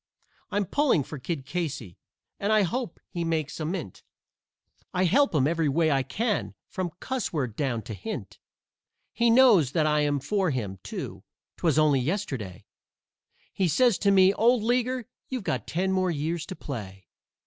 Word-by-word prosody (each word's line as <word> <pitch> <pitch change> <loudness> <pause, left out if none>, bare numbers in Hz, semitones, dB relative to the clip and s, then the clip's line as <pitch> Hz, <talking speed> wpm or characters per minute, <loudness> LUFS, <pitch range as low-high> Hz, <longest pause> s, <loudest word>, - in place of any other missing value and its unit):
I'm 205 0 0
pulling 265 - +2
for 150 +2 -8
Kid 140 0 -4
Casey, 140 - -4 0.4
and 200 +2 0
I 215 -1 +5
hope 235 +2 -3
he 175 - -4
makes 160 -3 -2
a 155 - -2
mint, 165 - -4 0.9
I 180 - +2
help 275 - +3
him 135 -3 +3
every 160 -1 +1
way 160 +2 +2
I 135 -1 +3
can, 215 - -2
from 185 -2 -3
cussword 155 - -2
down 125 -6 -1
to 110 - -7
hint; 95 - -6 0.7
He 235 0 +3
knows 225 - +6
that 155 -2 +2
I 150 0 +3
am 145 -1 +1
for 190 +6 0
him, 105 -9 -3
too - - -6 0.3
'twas 160 -4 +1
only 150 -3 +4
yesterday 130 - -3 0.9
He 190 - +1
says 240 - +3
to 200 - +2
me, 190 -1 +6
"Old 230 +2 +3
leaguer, 245 +1 0 0.2
you've 255 -4 -3
got - - -2
ten 190 +3 0
more 185 -1 +1
years 160 +1 -2
to 190 - -6
play." 95 - -7
165 Hz, 165 wpm, -27 LUFS, 140-205 Hz, 0.9 s, knows